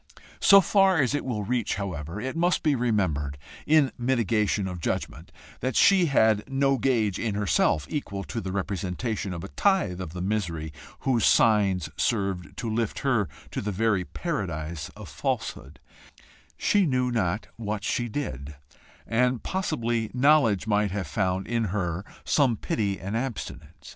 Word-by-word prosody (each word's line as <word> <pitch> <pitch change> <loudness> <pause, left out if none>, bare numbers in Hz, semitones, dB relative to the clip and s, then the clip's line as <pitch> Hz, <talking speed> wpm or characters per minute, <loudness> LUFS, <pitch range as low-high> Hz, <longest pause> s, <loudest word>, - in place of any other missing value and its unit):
So 195 0 +8
far 195 -2 +4
as 135 -2 +2
it 145 - -1
will 110 -5 -2
reach, 120 +1 -1
however, 90 -3 -5
it 130 +6 -4
must 175 +2 +1
be 155 -3 +3
remembered, 95 - 0 0.3
in 150 -3 +4
mitigation 110 -5 +1
of 90 -2 -5
judgment, - - -3 0.3
that 130 -1 -2
she 190 -3 +5
had 110 -6 +3
no 135 0 +2
gauge 110 -6 +1
in 110 -4 -1
herself 95 -6 +2
equal 100 -10 -4
to 115 - -5
the 95 - -4
representation 100 +2 -3
of 85 -2 -5
a 95 - -7
tithe 190 - +1
of 80 -3 -6
the 90 - -6
misery 85 -6 -2 0.3
whose 125 -4 +1
signs 100 -6 +3
served 95 -5 -1
to 120 - -4
lift 110 -1 -1
her 120 - +2 0.2
to - - -3
the 105 - -2
very 105 -1 +1
Paradise 80 -2 -4
of - - -10
falsehood: 70 +4 -4 0.8
she 200 -4 +3
knew 125 -2 +1
not 105 -3 0
what 105 -2 -3
she 120 +3 -1
did, 75 - -5 0.5
and 125 +1 +1
possibly 120 - -1
knowledge 125 -7 +4
might 105 -1 +2
have 95 0 -3
found 95 +4 -1
in 115 -1 0
her 90 -2 -2 0.2
some 130 -6 +3
pity 100 -3 -1
and 100 +3 -4
abstinence. 80 - -5
105 Hz, 155 wpm, -26 LUFS, 95-125 Hz, 0.8 s, So